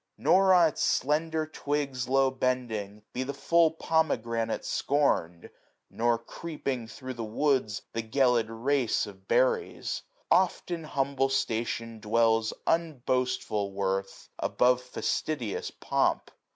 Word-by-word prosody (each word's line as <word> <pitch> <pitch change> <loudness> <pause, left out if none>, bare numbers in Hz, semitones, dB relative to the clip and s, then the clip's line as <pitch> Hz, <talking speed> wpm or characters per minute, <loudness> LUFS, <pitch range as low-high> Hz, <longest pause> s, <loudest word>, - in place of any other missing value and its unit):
Nor, 190 0 +4
on 170 -2 +6
its - - -6
slender 155 +3 +1
twigs 145 -4 -2
680 130 - -1
I.ow 135 0 +5
bending, 120 -6 -2
be 125 - -2
the 135 +1 -3
full 165 +4 +4
pomegranate 120 -9 -1
scorn'd 110 - 0
j - - -11 0.4
Nor, 120 0 +1
creeping 130 -1 -5
thro* 130 +2 -7
the 120 -2 -5
woods, 115 -2 0
the 115 - -1
gelid 120 0 +2
race 125 +2 0
Of 95 -2 -13
berries. 475 -3 +1 0.3
Oft 185 -1 +2
in 165 -2 -3
humble 135 -2 0
station 115 -3 -2
dwells 110 +1 +2
Unboastful 125 -9 0
worth, 95 0 -2
above 125 0 +2
fastidious 125 -1 -2
pomp. - - 0
130 Hz, 125 wpm, -28 LUFS, 115-150 Hz, 0.4 s, on